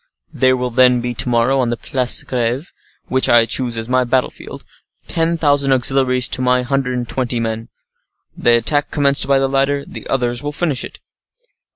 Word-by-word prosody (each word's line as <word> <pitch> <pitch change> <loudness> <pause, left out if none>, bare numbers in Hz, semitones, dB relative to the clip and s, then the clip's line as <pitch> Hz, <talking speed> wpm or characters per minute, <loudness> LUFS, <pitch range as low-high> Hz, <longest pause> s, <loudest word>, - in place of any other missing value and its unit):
"There 130 0 +2
will 125 0 -3
then 125 0 +4
be, 120 0 -3
to 120 - -2
morrow, 120 +3 +2
on 125 -2 0
the 120 - -2
Place 125 0 0
de - - -18
Greve, 125 +5 -2 0.3
which 130 0 +1
I 115 -1 +5
choose 120 -1 -1
as 115 0 -4
my 130 +1 +2
battle 125 +1 0
field, - - -11 0.4
ten 165 +1 0
thousand 145 -3 +2
auxiliaries 130 -1 +2
to 130 - -1
my 125 0 +2
hundred 125 -1 -1
and 120 -1 -4
twenty 125 -1 -2
men. 115 0 -4 0.7
The 120 0 +3
attack 145 +5 0
commenced 140 -2 +2
by 140 0 +3
the 135 0 +1
latter, 140 +1 0
the - - -9
others 120 -2 -1
will 145 0 -5
finish 145 -5 -1
it." - - -9
130 Hz, 195 wpm, -17 LUFS, 120-135 Hz, 0.7 s, I